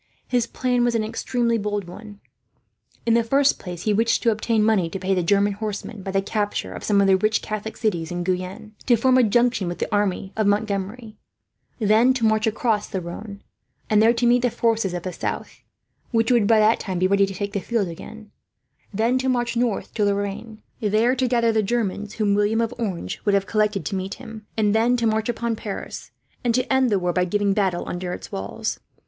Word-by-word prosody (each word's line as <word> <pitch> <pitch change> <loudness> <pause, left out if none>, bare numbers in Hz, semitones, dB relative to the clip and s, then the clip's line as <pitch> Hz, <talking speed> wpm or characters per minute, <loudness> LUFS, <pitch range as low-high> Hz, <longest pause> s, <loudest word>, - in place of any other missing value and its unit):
His 245 -2 +1
plan 250 -1 0
was 240 -1 +1
an 225 - +1
extremely 235 +1 -1
bold 205 0 -2
one. 205 +3 -11 0.8
In 230 - +3
the 235 0 +4
first 275 +4 +2
place, 175 -2 -7
he 215 - +1
wished 230 +2 +2
to 230 - +4
obtain 220 0 +1
money 210 -6 +2
to 195 - -5
pay 190 +1 -1
the 185 - +1
German 200 +3 +2
horsemen, 210 0 -5
by 195 - -6
the 195 0 0
capture 205 0 -2
of - - -8
some 200 -2 +3
of - - +4
the 190 -1 +5
rich 215 +3 +1
Catholic 215 +1 -5
cities 175 -8 -1
in 175 0 -3
Guyenne; 185 +3 -3
to 245 - +6
form 255 +3 +3
a - - +5
junction 240 -2 +2
with 175 - -4
the - - -3
army 195 -1 -1
of 215 -2 +1
Montgomery; 210 +2 -2 0.6
then 225 +4 +4
to 235 -3 0
march 220 0 +2
across 220 -1 0
to - - -20
the 190 - -1
Rhone, 200 +4 -8 0.5
and 210 0 +5
there 225 +1 +6
to 240 +1 0
meet 240 +1 +4
the 245 - +2
forces 225 -5 0
of 175 - -4
the 185 - -4
south, - - -5 0.5
which 225 0 +1
would 235 -5 +4
by 225 - +5
that 215 +1 +4
time 190 -3 -3
be 185 - +2
ready 200 +1 +3
to 195 - -7
take 200 +1 -4
the 200 - 0
field 215 0 -1
again; 210 +5 -10 0.6
then 230 +5 +1
to 260 0 0
march 240 -1 0
north 235 -3 -1
to 215 - 0
Lorraine, 205 +2 -3 0.2
there 220 +3 +2
to 260 0 +1
gather 235 -1 +2
in - - +2
the 220 - +3
Germans 210 -1 -2
whom 210 -2 +1
William 205 +2 +2
of 230 -1 0
Orange 185 - -3
would 205 - +2
have 195 0 +1
collected 210 -4 0
to 195 - -2
meet 190 +1 -3
him; 220 -2 -11
and 210 -2 +2
then 235 +3 +3
to 235 - 0
march 220 +1 +1
upon 235 -1 -1
Paris, 210 -2 -7 0.3
and 235 -2 +1
to 255 0 +1
end 265 -1 +3
the 205 - +2
war 180 -1 -1
by 180 - +2
giving 200 +2 +1
battle 190 -4 0
under 180 0 -4
its - - -8
walls. 95 +1 -4
215 Hz, 225 wpm, -23 LUFS, 195-230 Hz, 0.8 s, to